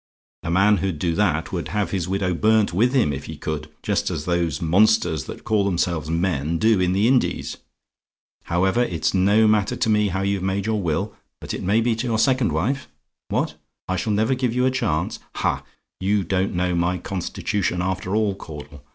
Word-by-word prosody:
A - - -5
man 100 +4 +4
who'd 95 -3 -2
do 85 +2 0
that - - 0
would - - -3
have 105 -1 -1
his 95 -3 -1
widow 95 -1 0
burnt 105 +1 +2
with 115 +7 +3
him, 120 - +2
if 70 - -6
he - - -7
could 75 0 -4
just - - 0
as 75 - -4
those 85 -5 0
monsters, 85 -4 +3
that - - -9
call 105 -2 +1
themselves 85 -4 -1
men, 85 -2 0
do 110 +1 +3
in 90 0 +2
the 100 +4 +3
Indies. 130 0 +1 0.9
"However, 95 +6 +1
it's 80 -9 0
no 100 +4 +4
matter 105 -1 +2
to - - 0
me 105 -1 +3
how 95 0 -2
you've 100 -1 0
made 95 +1 -1
your 110 -1 0
will; 95 +5 -1 0.3
but - - -6
it - - -4
may 105 +5 +2
be 115 0 +1
to 120 +3 -2
your 115 -2 +1
second 130 - +2
wife. 125 - -1 0.4
What? - - -1 0.3
"I 95 - -1
SHALL 105 +4 -1
NEVER 110 +5 +2
GIVE 125 -2 -1
YOU 125 0 +2
A 130 - +3
CHANCE? 90 -10 -1 0.2
"Ha! - - -1 0.4
you 100 +1 +1
don't 95 +1 -1
know 90 0 0
my 85 +1 +1
constitution 90 0 -2
after 95 +1 -2
all, 110 -2 +2
Caudle. 75 -5 -10
95 Hz, 200 wpm, -23 LUFS, 85-110 Hz, 0.9 s, man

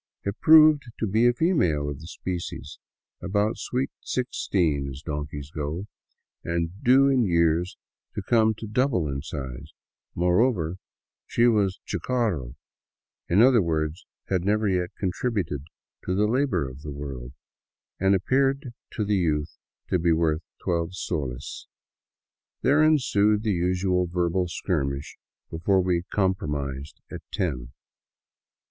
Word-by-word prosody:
It 100 +1 -4
proved 155 -2 +7
to - - -1
be 110 +4 +3
a 120 - +4
female 90 - +1
of 70 -1 -5
the 80 - -10
species, 85 -5 -6 0.4
about 105 +3 0
sweet 130 +2 -2
sixteen 85 - -1
as 70 +3 -9
donkeys 75 -1 -5
go, 80 +5 -4 0.6
and 85 -1 -1
due 135 +3 +6
in 135 -2 +3
the 110 - +2
years 85 +1 +2 0.4
to 105 - -3
come 110 +1 +3
to 110 - -8
double 110 - +1
in 70 -1 -3
size; 70 0 -7 0.4
moreover, 90 -1 +2 0.5
she 120 - +2
was 105 -5 +2
chucaro, 105 - -1 0.7
in 100 +6 +5
other 125 -3 +6
words 80 -2 -2 0.2
had 95 -3 0
never 105 +2 +1
yet 90 -2 0
contributed 95 - -2 0.4
to 90 - 0
the 105 +2 +3
labor 125 - +1
of 65 +2 -10
the 75 - -7
world, 70 -3 -7 0.7
and 95 +1 +4
appeared 135 +5 +1 0.2
to 105 - -1
the 105 0 +1
youth 75 -5 -1 0.3
to 90 - +2
be 85 0 +2
worth 80 -1 +1 0.2
twelve 85 +1 -1
soles. 70 -8 -4 1.0
There 145 +4 +4
ensued 105 -9 +3
the 110 - +1
usual 90 +1 +1
verbal 90 +1 0
skirmish 70 -5 -3 0.3
before 95 +4 +2
we 90 -2 +1
compromised 75 -7 -2
at - - -6
ten. 65 -10 -2
90 Hz, 135 wpm, -25 LUFS, 75-110 Hz, 1.0 s, proved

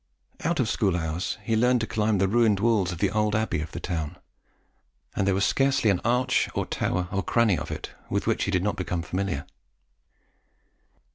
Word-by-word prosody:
Out 165 0 0
of 125 - +2
school 95 -5 +1
hours 80 +2 -2
he 115 - 0
learnt 125 +2 +3
to - - 0
climb 110 -2 +1
the 95 +1 +2
ruined 110 -1 +3
walls 105 -4 +2
of 90 - -5
the 95 +2 +1
old 105 0 +1
abbey 110 -8 0
of 80 - -6
the - - -5
town, 80 -4 -3 1.0
and 95 - 0
there 100 - +3
was 100 - +2
scarcely 135 -5 +3
an 90 - 0
arch, 125 +2 +2
or - - 0
tower, 90 0 -1
or 100 0 0
cranny 115 0 +2
of - - -5
it - - -6 0.2
with - - -1
which - - +1
he - - -2
did 95 -2 +1
not 105 - -1
become 90 -2 -2
familiar. 95 +3 -2
100 Hz, 200 wpm, -26 LUFS, 90-115 Hz, 1.0 s, learnt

